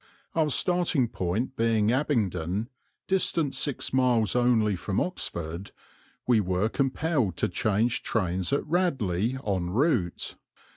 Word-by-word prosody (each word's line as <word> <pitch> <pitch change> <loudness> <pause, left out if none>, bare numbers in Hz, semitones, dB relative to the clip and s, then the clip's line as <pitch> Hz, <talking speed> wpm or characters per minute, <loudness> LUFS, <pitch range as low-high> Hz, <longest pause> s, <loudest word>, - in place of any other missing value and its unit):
Our 160 -2 +2
starting 170 - +2
point 105 +10 -2
being 115 -1 +2
Abingdon, 110 - 0 0.4
distant 170 -6 0
six 145 -3 -2
miles 125 -6 +2
only 115 -4 +3
from 95 +3 -2
Oxford, 85 - -3 0.6
we 120 -3 +4
were 95 +2 0
compelled 135 - 0
to - - +1
change 110 +4 0
trains 95 -4 -1
at 140 - 0
Radley 130 - 0
en 95 -4 -1
route. 110 - 0
115 Hz, 115 wpm, -27 LUFS, 95-135 Hz, 0.6 s, we